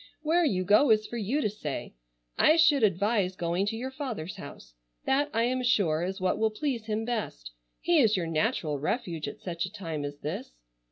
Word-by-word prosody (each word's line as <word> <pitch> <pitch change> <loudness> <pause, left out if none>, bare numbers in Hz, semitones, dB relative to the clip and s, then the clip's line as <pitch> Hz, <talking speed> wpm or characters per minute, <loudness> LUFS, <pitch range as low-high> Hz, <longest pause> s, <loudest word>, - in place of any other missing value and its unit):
Where 335 +3 +3
you 190 - +1
go 210 +8 +5
is 215 -1 +4
for 240 - -6
you 235 +8 0
to 215 - +1
say. 155 -9 -5 0.4
I 310 - +5
should 320 -4 +5
advise 200 -1 +2
going 175 +3 -1
to 225 - -1
your 260 +3 -4
father's 235 - -5
house. - - -11 0.3
That 285 +2 +2
I 230 +1 +1
am 255 +2 0
sure 195 -10 +2
is 190 +3 -3
what 185 +2 0
will 220 0 +3
please 235 0 -3
him 220 +1 -1
best. 135 - -4 0.3
He 345 -2 +3
is 220 -6 +4
your 175 - -1
natural 160 - 0
refuge 165 - -2
at - - -6
such 170 -2 -3
a - - -12
time 165 -8 -5
as 145 0 -5
this. 145 - -6
210 Hz, 205 wpm, -28 LUFS, 170-245 Hz, 0.4 s, go